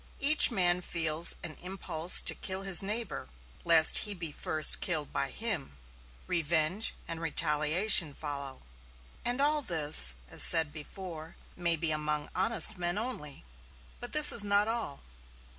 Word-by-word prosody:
Each 300 Hz, +2 st, +8 dB
man 180 Hz, -5 st, +1 dB
feels 160 Hz, -2 st, +1 dB
an 160 Hz, -2 st, -8 dB
impulse 180 Hz, -2 st, 0 dB
to -, -, +2 dB
kill 190 Hz, 0 st, -7 dB
his 195 Hz, -3 st, +3 dB
neighbor, 205 Hz, -, -7 dB, 0.3 s
lest 165 Hz, -2 st, +6 dB
he 205 Hz, -1 st, -1 dB
be 170 Hz, -4 st, -7 dB
first 155 Hz, +1 st, -1 dB
killed 155 Hz, -5 st, -4 dB
by 135 Hz, -, -3 dB
him. 175 Hz, -, -6 dB, 0.5 s
Revenge 170 Hz, +4 st, -1 dB
and 165 Hz, -1 st, -8 dB
retaliation 160 Hz, +1 st, +2 dB
follow. 140 Hz, -3 st, -8 dB, 0.6 s
And 245 Hz, +2 st, -3 dB
all 295 Hz, +1 st, -1 dB
this, 150 Hz, -, +3 dB
as -, -, +2 dB, 0.3 s
before 160 Hz, 0 st, -11 dB, 0.2 s
said, -, -, -21 dB
may 170 Hz, -1 st, +1 dB
be 165 Hz, 0 st, -4 dB
among 150 Hz, -1 st, -5 dB
honest 220 Hz, -3 st, -1 dB
men 175 Hz, +2 st, -3 dB
only. 205 Hz, -, -8 dB, 0.5 s
But 245 Hz, -, -7 dB
this 300 Hz, -1 st, +7 dB
is 210 Hz, -, +2 dB
not 205 Hz, +1 st, 0 dB
all. 225 Hz, -11 st, -5 dB
170 Hz, 140 wpm, -27 LUFS, 155-205 Hz, 0.6 s, Each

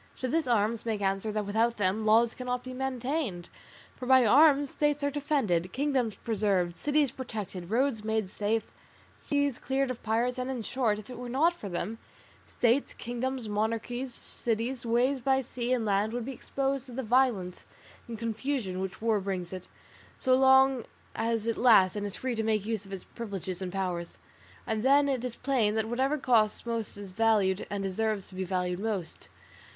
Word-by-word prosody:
To 255 Hz, -, -2 dB
this 315 Hz, +2 st, 0 dB
arms 225 Hz, -1 st, +1 dB
make 220 Hz, -3 st, -2 dB
answer 195 Hz, +2 st, 0 dB
that 210 Hz, -1 st, -2 dB
without 225 Hz, +3 st, +1 dB
them 205 Hz, +2 st, 0 dB
laws 230 Hz, +2 st, +5 dB
cannot 250 Hz, -1 st, -3 dB
be 255 Hz, -, -7 dB
maintained, 255 Hz, -, -3 dB, 0.4 s
for 250 Hz, -, -7 dB
by 260 Hz, -1 st, +6 dB
arms 285 Hz, +3 st, +5 dB
states 295 Hz, -1 st, 0 dB
are 285 Hz, -, +1 dB
defended, 265 Hz, -, 0 dB
kingdoms 260 Hz, -6 st, 0 dB
preserved, 195 Hz, -6 st, +1 dB
cities 295 Hz, 0 st, +1 dB
protected, 205 Hz, -8 st, -6 dB
roads 235 Hz, -1 st, +1 dB
made 220 Hz, -3 st, -1 dB
safe, 215 Hz, +2 st, 0 dB, 0.6 s
seas 285 Hz, -3 st, 0 dB
cleared 270 Hz, 0 st, 0 dB
of 245 Hz, -, -7 dB
pirates; 235 Hz, +3 st, 0 dB
and, 255 Hz, +1 st, -2 dB
in 250 Hz, -4 st, -3 dB
short, 230 Hz, -3 st, 0 dB
if 215 Hz, +3 st, -10 dB
it 245 Hz, -, -8 dB
were 245 Hz, -1 st, -6 dB
not 305 Hz, +8 st, +3 dB
for 215 Hz, -, -8 dB
them, 190 Hz, +5 st, -4 dB, 0.5 s
states, 245 Hz, +3 st, +1 dB
kingdoms, 245 Hz, 0 st, -4 dB
monarchies, 230 Hz, +4 st, -2 dB
cities, 235 Hz, +1 st, -3 dB
ways 250 Hz, +4 st, +2 dB
by 265 Hz, +2 st, +3 dB
sea 250 Hz, -1 st, -4 dB
and 245 Hz, -3 st, +1 dB
land 205 Hz, +2 st, +1 dB
would 240 Hz, -1 st, -3 dB
be 270 Hz, -, -4 dB
exposed 275 Hz, +2 st, -2 dB
to 250 Hz, -, -10 dB
the 265 Hz, +2 st, -3 dB
violence 225 Hz, -7 st, +1 dB, 0.4 s
and 230 Hz, -1 st, -6 dB
confusion 230 Hz, -3 st, -2 dB
which 190 Hz, +2 st, -5 dB
war 225 Hz, -2 st, +3 dB
brings 185 Hz, -3 st, -4 dB
with 185 Hz, -1 st, -7 dB
it, -, -, -25 dB, 0.5 s
so 260 Hz, -, +2 dB
long 265 Hz, -1 st, +5 dB, 0.3 s
as 225 Hz, -1 st, -1 dB
it 230 Hz, -1 st, -1 dB
lasts 215 Hz, -7 st, +6 dB
and 205 Hz, 0 st, -2 dB
is 200 Hz, -, -5 dB
free 255 Hz, -1 st, -2 dB
to 225 Hz, -, -1 dB
make 215 Hz, -2 st, 0 dB
use 220 Hz, -3 st, -3 dB
of -, -, -13 dB
its 195 Hz, -2 st, -6 dB
privileges 195 Hz, -5 st, -6 dB
and 185 Hz, -1 st, -3 dB
powers. 180 Hz, -3 st, -3 dB, 0.5 s
And 220 Hz, -1 st, -1 dB
then 280 Hz, +3 st, +5 dB
it 260 Hz, -3 st, -1 dB
is 250 Hz, -2 st, -4 dB
plain 245 Hz, -6 st, +1 dB
that 220 Hz, 0 st, 0 dB
whatever 265 Hz, +6 st, 0 dB
costs 235 Hz, -6 st, +2 dB
most 230 Hz, -3 st, -3 dB
is 200 Hz, -2 st, -7 dB
valued 210 Hz, -2 st, +2 dB
and 200 Hz, -1 st, -3 dB
deserves 200 Hz, +1 st, -1 dB
to -, -, -13 dB
be 190 Hz, 0 st, -3 dB
valued 180 Hz, -1 st, -1 dB
most. 200 Hz, -6 st, -4 dB
230 Hz, 190 wpm, -29 LUFS, 205-260 Hz, 0.6 s, by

